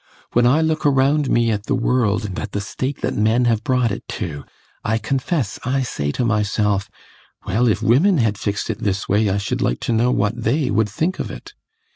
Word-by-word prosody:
When 120 0 +4
I 145 +6 +4
look 160 -1 0
around 140 +1 +3
me 115 -1 +2
at 105 0 -3
the 140 - +1
world, 115 -4 +1
and 95 -3 -4
at 105 - -6
the 105 - -1
state 130 +7 -4
that - - -1
men 110 +4 +2
have 115 -2 +1
brought 125 -5 +1
it - - -4 0.2
to, 75 -8 -5 0.4
I 110 +1 +1
confess 130 - -2
I 135 +1 0
say 70 - -2
to 125 - -1
myself, 105 -2 0 0.6
"Well, 115 +6 +1
if 110 - +1
women 165 - +4
had 110 -6 +1
fixed 100 +2 -2
it 110 - -6
this 100 -4 -2
way 105 +1 +2
I 95 - 0
should 100 -1 -2
like - - 0
to 120 - -1
know 115 +2 +2
what 115 0 0
they 130 +4 +1
would 105 +1 +2
think 165 - -2
of - - -3
it!" - - -10
115 Hz, 215 wpm, -20 LUFS, 105-130 Hz, 0.6 s, When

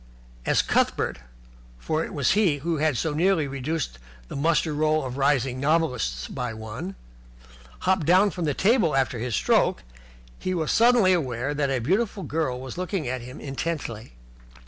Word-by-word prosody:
As - - +3
Cuthbert, - - 0 0.6
for 155 - -1
it - - -6
was 140 -5 +1
he 190 -8 +3
who 165 +3 -2
had 150 -3 +1
so 160 +3 -1
nearly 170 0 +2
reduced 135 - -3 0.3
the - - -6
muster 155 +2 +1
roll 155 0 +1
of 125 -1 -5
rising 135 -2 +1
novelists 130 - 0
by 120 -2 -4
one, 110 -3 -6 0.9
hopped 185 -5 +1
down 190 +4 +5
from 175 - -3
the 145 -3 0
table 195 - +3
after 130 -3 +1
his 120 -1 -2
stroke, - - +2 0.6
he 185 - -2
was 160 -3 -1
suddenly 230 -5 +5
aware 135 -4 -1
that 145 -1 0
a 135 - +1
beautiful 195 - 0
girl 150 -5 -2
was 130 +5 -7
looking 185 -4 -2
at 130 0 -3
him 125 +2 -9
intently. 135 - -4
150 Hz, 165 wpm, -25 LUFS, 125-170 Hz, 0.9 s, down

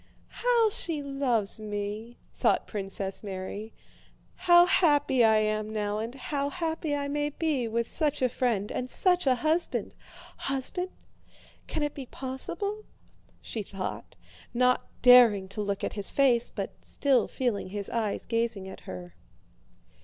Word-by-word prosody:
"How 470 -3 +2
she 320 -6 -2
loves 260 -8 0
me!" 210 +2 -5 0.2
thought - - +2
Princess 195 -2 -3
Mary. 200 +2 -6 0.6
"How 350 -1 +6
happy 290 -8 +4
I 220 -1 +6
am 215 0 0
now, 210 -1 -2
and 230 +3 -4
how 280 +1 -2
happy 320 -2 -2
I 285 0 -2
may 290 +1 -1
be 295 -5 -1
with 230 +1 -1
such 300 -3 0
a - - +5
friend 230 -5 -1
and 250 - -3
such 360 -1 +2
a 255 - +5
husband! 315 +6 0 0.4
Husband? 275 +7 -2 0.8
Can 310 - -2
it 295 - -1
be 270 -3 -7
possible?" 335 - -3 0.6
she 225 - -4
thought, 195 -2 -6 0.4
not 250 +1 +3 0.2
daring 240 -6 +7
to 210 - -4
look 200 -1 -2
at - - -2
his 200 -2 -3
face, 250 -4 +3
but - - -4
still 275 -3 +2
feeling 235 -7 -2
his 200 0 -4
eyes 220 -3 -1
gazing 230 -4 -1
at 190 - -9
her. 90 -1 -8
245 Hz, 145 wpm, -28 LUFS, 210-290 Hz, 0.8 s, daring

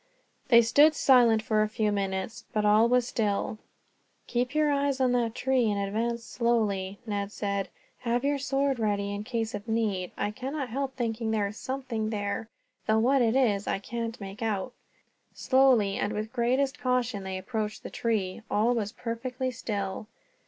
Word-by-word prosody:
They 235 -2 +7
stood 295 +7 +5
silent 240 -6 +5
for 215 -2 +2
a 215 - +1
few 215 -1 0
minutes, 195 +1 -3
but 215 -1 +1
all 215 +3 +5
was 250 -1 +3
still. 215 -1 -1 0.7
"Keep 250 +3 -1
your 305 -1 +3
eyes 280 -1 +1
on 255 -1 +3
the 240 -2 +2
tree 250 0 +1
and 205 -1 0
advance 230 +4 -1
slowly," 210 -6 0
Ned 205 -2 -3
said. 200 -2 -2 0.3
"Have 240 +1 -1
your 285 0 +1
sword 275 -1 0
ready 200 -2 0
in 205 +1 -4
case 225 -1 -2
of 205 +2 -6
need. 215 -5 -1
I 205 - -1
cannot 265 +3 -4
help 270 +2 -3
thinking 230 -2 -2
there 215 -2 +1
is 210 - -10
something 255 -5 -3
there, 205 +1 -3 0.4
though 220 - +3
what 260 +4 +3
it 230 0 +2
is 210 -7 +2
I - - +1
can't 230 +3 -5
make 195 +1 -8
out." 220 +1 -2 0.6
Slowly, 255 -7 +3
and 205 - -1
with 215 +1 -3
the - - -36
greatest 260 +3 +1
caution, 250 -4 0
they 190 0 -4
approached 215 +1 -4
the - - -7
tree. 215 -3 -1
All 225 +4 +2
was 210 -4 -2
perfectly 250 +2 -4
still. 205 -4 -4
225 Hz, 175 wpm, -28 LUFS, 210-250 Hz, 0.7 s, They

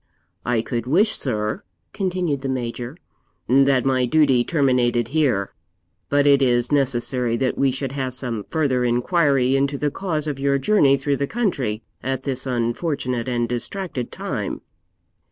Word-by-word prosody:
'I 120 -2 +1
could 120 -1 -3
wish, 200 - +3
sir,' 105 -5 -1 0.3
continued 180 -7 -1
the 135 - -3
Major, 125 +2 -4 0.5
'that 135 0 +4
my 130 -2 +2
duty 135 -4 +3
terminated 125 -6 +1
here; 130 -10 +1 0.6
but 145 0 +3
it 140 -1 +5
is 120 -1 +2
necessary 125 -3 +1
that 130 +1 0
we 135 - +2
should 130 0 -3
have 130 -2 -3
some 120 -5 -3
further 140 -6 0
inquiry 130 +1 +2
into 140 +1 +1
the 145 +1 -1
cause 160 -4 -2
of 145 -3 -3
your 140 0 +2
journey 140 -3 +4
through 140 +1 -1
the 140 - -1
country 135 - -1 0.2
at 130 0 -3
this 135 -1 -3
unfortunate 125 +1 -1
and 120 -2 0
distracted 125 +2 -3
time.' - - -4
135 Hz, 150 wpm, -22 LUFS, 120-145 Hz, 0.6 s, it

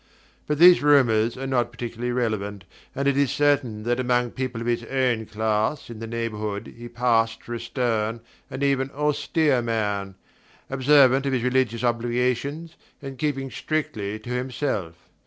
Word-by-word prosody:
But 150 - 0
these 175 +2 +8
rumours 120 -6 +3
are 135 - -5
not 120 -3 0
particularly 120 +1 -4
relevant, 105 -5 -2 0.3
and 140 +1 -1
it 140 - +3
is 140 -1 +2
certain 135 -7 +1
that 120 +2 0
among 125 -1 +1
people 130 -3 -4
of 115 - -5
his 120 0 0
own 125 -4 0
class 110 +5 -1
in 110 - -9
the 115 - -6
neighbourhood 110 -3 -4
he 120 0 -9
passed 115 -2 +1
for 120 - -7
a 120 - -3
stern 115 -2 -1 0.3
and 140 - -4
even 135 -1 +1
austere 150 -1 +1
man, 105 -4 -2 0.6
observant 135 0 +4
of 135 - 0
his 125 -2 0
religious 125 -2 +1
obligations, 125 +7 -1 0.2
and 135 -3 -8
keeping 135 -2 -2
strictly 130 -10 -3
to 110 +3 -9
himself. 125 - -2
120 Hz, 155 wpm, -24 LUFS, 115-135 Hz, 0.6 s, these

